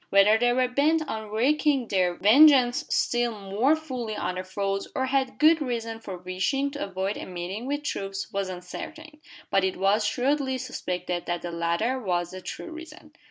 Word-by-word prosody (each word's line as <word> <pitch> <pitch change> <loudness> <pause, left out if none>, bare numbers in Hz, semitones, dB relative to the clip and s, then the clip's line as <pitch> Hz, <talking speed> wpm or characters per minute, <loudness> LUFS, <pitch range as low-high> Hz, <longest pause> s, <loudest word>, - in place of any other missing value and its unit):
Whether 205 +3 +5
they 245 +1 +3
were 255 +1 +2
bent 305 +5 +1
on 220 -4 -5
wreaking 270 +3 +1
their 180 -3 +1
vengeance 265 - +6
still 240 -3 0
more 205 +10 +2
fully 255 -8 -5
on 185 - -2
their 185 0 -4
foes, 195 +1 -2
or 260 - +1
had 265 0 0
good 315 +1 +5
reason 230 -4 -3
for 195 -4 -7
wishing 190 +11 -1
to 285 - -4
avoid 195 +1 -3
a - - -7
meeting 185 +6 -5
with 290 +1 -2
troops, 195 -7 -4
was 195 -1 -1
uncertain; 305 - -8 0.3
but 195 - +3
it 190 -1 0
was 200 +3 +2
shrewdly 265 +4 0
suspected 180 -6 -4
that 175 0 -2
the 175 - -4
latter 170 +10 0
was 175 -6 -1
the 185 0 -8
true 340 - -7
reason. 325 0 -11
220 Hz, 180 wpm, -26 LUFS, 190-275 Hz, 0.3 s, vengeance